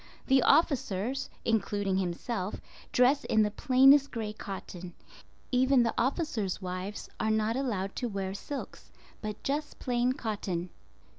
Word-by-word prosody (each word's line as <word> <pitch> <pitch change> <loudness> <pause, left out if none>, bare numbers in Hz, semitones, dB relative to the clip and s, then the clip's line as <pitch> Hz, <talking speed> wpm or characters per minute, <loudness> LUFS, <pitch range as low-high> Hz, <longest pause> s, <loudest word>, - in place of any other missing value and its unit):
The 265 -1 +4
officers, 265 - +2 0.2
including 205 -3 +1
himself, 185 +2 -3 0.3
dress 255 +3 +4
in 220 -1 +3
the 210 - 0
plainest 270 +4 +5
gray 220 -3 -4
cotton. 185 -4 -8 0.6
Even 255 0 +4
the 230 - 0
officers' 250 - -1
wives 185 +2 -5
are 220 - 0
not 220 +1 +1
allowed 210 -8 -2
to 245 - -1
wear 195 -2 -3
silks, 280 +8 -7 0.3
but 210 -1 -6
just 295 +2 -2
plain 245 0 +1
cotton. 200 -8 -3
220 Hz, 130 wpm, -30 LUFS, 195-260 Hz, 0.6 s, plainest